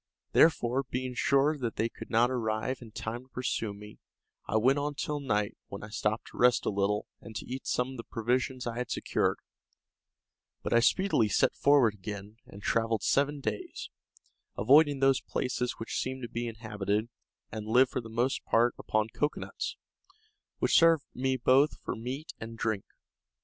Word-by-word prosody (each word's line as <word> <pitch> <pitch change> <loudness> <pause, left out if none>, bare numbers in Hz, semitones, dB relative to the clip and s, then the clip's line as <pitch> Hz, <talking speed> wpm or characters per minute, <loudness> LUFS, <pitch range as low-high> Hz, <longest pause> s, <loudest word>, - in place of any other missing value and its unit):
Therefore, 135 -5 +4
being 130 0 -3
sure 140 +4 +2
that 120 -3 -3
they 110 - +1
could - - -11
not 120 +2 +3
arrive 115 +1 -1
in 115 - -10
time 110 +2 -5
to 130 - -20
pursue 125 -4 -2
me, 105 +1 -12 0.5
I 110 - +1
went 130 +6 +3
on 145 0 -2
till 150 +1 -2
night, 105 -7 -1
when 100 - -8
I 105 - -8
stopped 105 +1 -2
to - - -13
rest 125 -1 +4
a - - +1
little, 100 +1 0 0.2
and 110 - -11
to - - -4
eat 130 +2 -6
some 125 +1 0
of 130 - -8
the 115 - -6
provisions 125 +3 -1
I 120 0 -3
had 125 -1 -3
secured; - - 0 1.3
but - - -1
I 115 - +6
speedily 120 - +3
set - - +3
forward 140 -6 +4
again, 105 +1 -8
and 100 +1 -12
travelled 115 -2 +1
seven 145 +1 +1
days, 110 -4 -4 0.7
avoiding 145 +2 +5
those 135 -1 +4
places 125 -1 -2
which 115 - -4
seemed 130 0 -3
to 120 - -5
be 120 +1 -3
inhabited, 110 -1 -2 0.4
and 110 -1 -6
lived 125 +3 +4
for - - -2
the 115 - -10
most 120 +4 0
part 120 +2 +3
upon 110 0 0
cocoanuts, 150 0 -3 0.8
which - - +4
served 165 -3 +5
me 130 +1 0
both 130 +4 +4
for - - -4
meat 130 +7 -6
and 115 +1 -7
drink. 110 -3 -1
120 Hz, 175 wpm, -30 LUFS, 110-130 Hz, 1.3 s, I